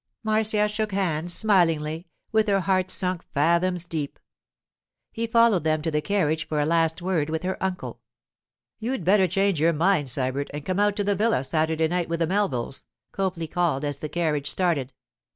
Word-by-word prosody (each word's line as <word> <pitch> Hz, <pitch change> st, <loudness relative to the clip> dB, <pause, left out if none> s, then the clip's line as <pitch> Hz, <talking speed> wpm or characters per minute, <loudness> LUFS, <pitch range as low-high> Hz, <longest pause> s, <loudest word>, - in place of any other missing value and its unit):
Marcia 215 Hz, -1 st, +2 dB
shook 215 Hz, 0 st, -3 dB
hands 175 Hz, -3 st, -1 dB
smilingly, 165 Hz, -5 st, +1 dB, 0.2 s
with 220 Hz, 0 st, +2 dB
her 195 Hz, -1 st, +2 dB
heart 185 Hz, 0 st, +1 dB
sunk 185 Hz, -2 st, 0 dB
fathoms 170 Hz, +4 st, +2 dB
deep. 155 Hz, -4 st, -4 dB, 0.9 s
He 230 Hz, 0 st, -3 dB
followed 230 Hz, -6 st, +4 dB
them 155 Hz, -1 st, 0 dB
to 160 Hz, -, -1 dB
the 150 Hz, 0 st, 0 dB
carriage 160 Hz, -3 st, 0 dB
for 150 Hz, -, -1 dB
a 145 Hz, -, +2 dB
last 165 Hz, +1 st, +1 dB
word 170 Hz, -5 st, 0 dB
with 160 Hz, +1 st, -3 dB
her 185 Hz, +1 st, -3 dB
uncle. 190 Hz, -1 st, -4 dB, 0.8 s
'You'd 230 Hz, -5 st, -3 dB
better 190 Hz, 0 st, +4 dB
change 195 Hz, -2 st, +1 dB
your 165 Hz, +1 st, +4 dB
mind, 165 Hz, -2 st, +2 dB
Sybert, 130 Hz, +2 st, -2 dB
and 145 Hz, -1 st, -6 dB
come 185 Hz, +1 st, -1 dB
out 205 Hz, 0 st, +2 dB
to 205 Hz, -, -1 dB
the 205 Hz, 0 st, +1 dB
villa 210 Hz, -, +1 dB
Saturday 160 Hz, +3 st, 0 dB
night 175 Hz, 0 st, -2 dB
with 170 Hz, 0 st, -2 dB
the 165 Hz, -, +2 dB
Melvilles,' 160 Hz, -9 st, -1 dB, 0.3 s
Copley 185 Hz, -4 st, -2 dB
called 160 Hz, -4 st, -1 dB
as 145 Hz, -1 st, -3 dB
the 155 Hz, -, -5 dB
carriage 150 Hz, -4 st, -1 dB
started. 160 Hz, -8 st, 0 dB
175 Hz, 180 wpm, -25 LUFS, 155-195 Hz, 0.9 s, followed